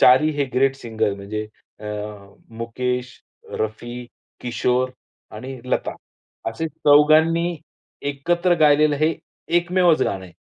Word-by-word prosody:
चारी 130 Hz, +5 st, +6 dB
हे 140 Hz, -, +3 dB
great 135 Hz, +1 st, +3 dB
singer 110 Hz, -5 st, -1 dB
म्हणजे 105 Hz, +2 st, -5 dB, 0.3 s
अ, -, -, -10 dB, 0.7 s
मुकेश, 125 Hz, +2 st, -3 dB, 0.3 s
रफी, 120 Hz, +3 st, -4 dB, 0.3 s
किशोर 125 Hz, +1 st, 0 dB, 0.5 s
आणि 130 Hz, +2 st, -7 dB
लता 125 Hz, -, -1 dB, 0.6 s
असे 160 Hz, +8 st, -3 dB
चौघांनी 160 Hz, +3 st, +4 dB, 0.5 s
एकत्र 175 Hz, +5 st, +1 dB
गायलेलं 150 Hz, 0 st, +5 dB
हे 155 Hz, +2 st, +2 dB, 0.4 s
एकमेवच 175 Hz, -1 st, +3 dB
गाणं 95 Hz, -1 st, -2 dB
आहे. 90 Hz, -, -13 dB
135 Hz, 110 wpm, -22 LUFS, 120-155 Hz, 0.7 s, चारी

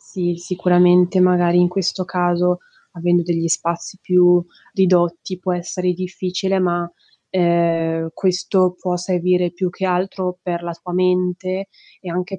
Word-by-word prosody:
Sì, 175 Hz, -2 st, -3 dB
sicuramente 180 Hz, +1 st, +3 dB
magari 175 Hz, -1 st, +4 dB
in 180 Hz, -, +5 dB
questo 185 Hz, 0 st, -2 dB
caso, 180 Hz, 0 st, 0 dB, 0.3 s
avendo 175 Hz, 0 st, +1 dB
degli 165 Hz, -1 st, -1 dB
spazi 170 Hz, +3 st, -2 dB
più 180 Hz, -1 st, +4 dB, 0.3 s
ridotti 180 Hz, -1 st, +1 dB
può 185 Hz, 0 st, -1 dB
essere 180 Hz, +1 st, -2 dB
difficile, 185 Hz, +1 st, -2 dB
ma, 175 Hz, -1 st, -1 dB, 0.4 s
ehm, 165 Hz, -2 st, +1 dB
questo 185 Hz, -1 st, +1 dB
può 180 Hz, -1 st, -2 dB
servire 180 Hz, 0 st, 0 dB
più 180 Hz, +1 st, -2 dB
che 190 Hz, -, -6 dB
altro 180 Hz, 0 st, -2 dB
per 175 Hz, -1 st, -4 dB
la 170 Hz, 0 st, -4 dB
tua 180 Hz, -, -8 dB
mente 185 Hz, +1 st, 0 dB, 0.3 s
e 180 Hz, -, -7 dB
anche 180 Hz, +3 st, -4 dB
180 Hz, 135 wpm, -19 LUFS, 175-185 Hz, 0.4 s, in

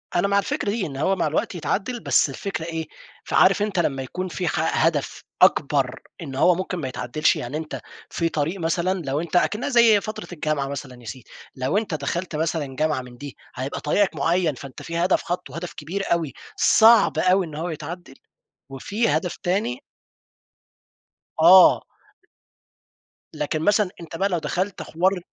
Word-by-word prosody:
أنا 175 Hz, +3 st, +3 dB
مع 200 Hz, 0 st, +3 dB
الفكرة 200 Hz, +1 st, -2 dB
دي، 215 Hz, -2 st, -1 dB
إن 135 Hz, -3 st, -6 dB
هو 190 Hz, +7 st, +1 dB
مع 165 Hz, -, 0 dB
الوقت 155 Hz, +4 st, -1 dB
يتعدّل، 195 Hz, -, -2 dB
بس -, -, +2 dB
الفكرة 195 Hz, -5 st, -5 dB
إيه؟ 165 Hz, -2 st, -4 dB, 0.4 s
فعارف 195 Hz, +2 st, +4 dB
أنت 205 Hz, -4 st, 0 dB
لما 135 Hz, -5 st, 0 dB
يكون 185 Hz, +8 st, -5 dB
في 180 Hz, +1 st, -3 dB
ح 160 Hz, +1 st, +1 dB
هدَف 150 Hz, -4 st, -1 dB, 0.2 s
أكبر، 140 Hz, -7 st, +3 dB, 0.2 s
إن 135 Hz, -4 st, -6 dB
هو 175 Hz, +5 st, +4 dB
ممكن 185 Hz, 0 st, -3 dB
ما 140 Hz, -5 st, -3 dB
يتعدّلش، 125 Hz, +4 st, 0 dB
يعني 125 Hz, +5 st, -4 dB
أنت 160 Hz, -1 st, -6 dB, 0.3 s
في 165 Hz, -1 st, -1 dB
طريق 160 Hz, +5 st, -2 dB
مثلًا 170 Hz, +3 st, 0 dB
لو 140 Hz, +1 st, -2 dB
أنت 170 Hz, +1 st, -6 dB
أكنّها 215 Hz, +9 st, +1 dB
زي 235 Hz, -5 st, +5 dB
فترة 215 Hz, 0 st, -6 dB
الجامعة 150 Hz, -3 st, -1 dB
مثلًا 130 Hz, -3 st, -7 dB
يا -, -, -15 dB
سيدي، 120 Hz, +2 st, -8 dB, 0.3 s
لو 130 Hz, +9 st, 0 dB
أنت 215 Hz, -6 st, -2 dB
دخَلت 160 Hz, +3 st, -3 dB
مثلًا 155 Hz, -4 st, -2 dB
جامعة 155 Hz, -3 st, 0 dB
من 125 Hz, -1 st, -13 dB
دي 145 Hz, 0 st, -9 dB, 0.2 s
هيبقى 130 Hz, +3 st, -4 dB
طريقك 175 Hz, +3 st, +1 dB
معيّن، 165 Hz, +2 st, +1 dB
فأنت 135 Hz, -1 st, -10 dB
في 170 Hz, 0 st, -5 dB
هدَف 180 Hz, +2 st, +2 dB
حاطّه، 170 Hz, -5 st, -4 dB
هدَف 175 Hz, +1 st, -6 dB
كبير 180 Hz, +7 st, -4 dB
أوي، 160 Hz, -6 st, -2 dB, 0.2 s
صعب 220 Hz, -, +5 dB
أوي 185 Hz, +2 st, +3 dB
إن 155 Hz, -2 st, -9 dB
هو 170 Hz, +3 st, -3 dB
يتعدّل 165 Hz, -2 st, -7 dB, 0.6 s
وفي 200 Hz, -, -1 dB
هدَف 160 Hz, +4 st, 0 dB
تاني 225 Hz, +8 st, -1 dB, 1.6 s
آه. 180 Hz, +2 st, +8 dB, 1.5 s
لكن 155 Hz, +1 st, -2 dB
مثلًا 205 Hz, +2 st, +3 dB
أنت 165 Hz, 0 st, -9 dB
بقى 195 Hz, +3 st, 0 dB
لو 175 Hz, -, 0 dB
دخَلت 185 Hz, +4 st, -2 dB
حوار 185 Hz, +3 st, 0 dB
165 Hz, 170 wpm, -23 LUFS, 145-185 Hz, 1.6 s, آه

